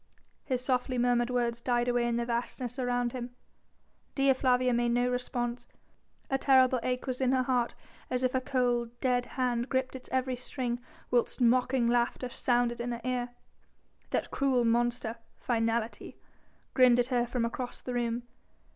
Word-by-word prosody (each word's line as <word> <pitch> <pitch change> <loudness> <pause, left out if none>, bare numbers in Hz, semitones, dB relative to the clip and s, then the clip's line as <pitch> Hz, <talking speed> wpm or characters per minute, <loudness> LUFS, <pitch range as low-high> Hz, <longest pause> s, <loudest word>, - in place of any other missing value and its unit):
'" - - -42
His 250 0 0
softly 255 -1 0
murmured 240 0 +2
words 235 -1 0
died 240 0 +1
away 240 -1 +2
in 235 - 0
the 235 0 0
vastness 240 +1 -3
around 245 -1 0
him. 245 -1 -6 0.8
Dea 275 -1 +4
Flavia 255 -1 +2
made 240 0 +1
no 245 +1 +2
response; 245 -1 -3 0.6
a 270 - 0
terrible 260 -2 +5
ache 250 +1 -2
was 255 -1 -3
in 260 0 +3
her 260 -1 +3
heart 250 -2 0 0.3
as 250 0 -1
if 255 - +1
a 260 - +1
cold, 245 -3 0
dead 245 -1 +1
hand 245 -1 0
gripped 260 0 -1
its 260 - -9
every 260 0 0
string, 245 -1 -3 0.3
whilst 245 +1 +1
mocking 250 0 +3
laughter 240 +1 +1
sounded 240 -1 0
in 240 0 -2
her 235 - -6
ear. 250 -1 -1 0.8
That - - -1
cruel 260 -3 +2
monster 235 0 0 0.2
Finality 230 -1 -1 0.6
grinned 250 -2 +6
at 245 +1 +1
her 240 -1 +2
from 240 -1 -1
across 245 +1 -4
the 250 - -5
room. 240 0 -1
245 Hz, 165 wpm, -30 LUFS, 240-255 Hz, 0.8 s, grinned